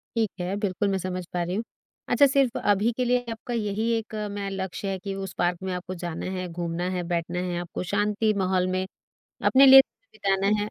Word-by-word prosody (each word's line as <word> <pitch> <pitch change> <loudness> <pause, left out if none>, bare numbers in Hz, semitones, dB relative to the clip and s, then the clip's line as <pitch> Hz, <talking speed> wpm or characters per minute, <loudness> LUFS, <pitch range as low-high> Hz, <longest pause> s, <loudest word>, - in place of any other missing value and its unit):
ठीक 225 -3 +2
है, 180 +2 -2
बिल्कुल 205 -1 -1
मैं 195 - +1
समझ 185 -1 -4
पा 175 - 0
रही 180 +2 -3
हूँ। 220 - -1 0.5
अच्छा, 285 - +6
सिर्फ 270 -3 +2
अभी 205 +3 +2
के 250 - +1
लिए 245 0 +1
आपका 225 +2 -6
यही 215 0 -1
एक 220 -1 -6 0.2
मैं 200 -1 -4
लक्ष्य 190 +1 -4
है 190 - -2
कि 195 +1 -5
उस 195 -2 -5
पार्क 175 0 +1
में 190 -1 -2
आपको 180 +1 -5
जाना 165 -2 -4
है, 185 -1 -3
घूमना 170 +1 -3
है, 180 -1 -2
बैठना 175 0 -2
है, 180 -1 -2
आपको 175 +1 -5
शांति 210 +1 +2
माहौल 185 -1 +1
में 185 0 -1 0.6
अपने 270 +1 +7
लिए 270 0 +11
समय - - -36
बिताना 195 +1 +1
है? 210 - -3
195 Hz, 220 wpm, -26 LUFS, 180-215 Hz, 0.6 s, लिए